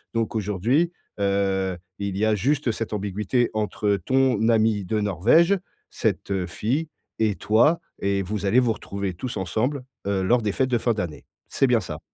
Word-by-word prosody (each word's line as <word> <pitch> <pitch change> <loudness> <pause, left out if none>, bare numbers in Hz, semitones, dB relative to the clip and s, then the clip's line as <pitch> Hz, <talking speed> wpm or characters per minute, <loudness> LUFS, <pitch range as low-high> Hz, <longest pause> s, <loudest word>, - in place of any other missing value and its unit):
Donc 115 0 -1
aujourd'hui, 110 - +1 0.3
heu, 95 -2 0 0.2
il 100 -1 -3
y 105 - +2
a 110 -1 +3
juste 130 +4 +1
cette 110 0 -4
ambiguïté 105 +4 0
entre 105 -1 0
ton 130 -4 +3
ami 110 -2 +3
de 105 +4 0
Norvège, 120 - +4 0.3
cette 95 -2 -1
fille 130 - -2 0.3
et 110 -2 +2
toi 120 - +3 0.2
et 100 0 +1
vous 100 +2 -3
allez 120 +6 +5
vous 120 -3 +2
retrouver 100 -2 -4
tous 125 +8 -5
ensemble, 110 - -1 0.2
heu, 100 -1 0
lors 120 +6 +3
des 105 -2 0
fêtes 130 -1 +1
de 120 - +2
fin 120 +1 +1
d'année. 90 -7 -5 0.2
C'est - - +2
bien - - +4
ça? - - -6
105 Hz, 175 wpm, -24 LUFS, 100-120 Hz, 0.3 s, allez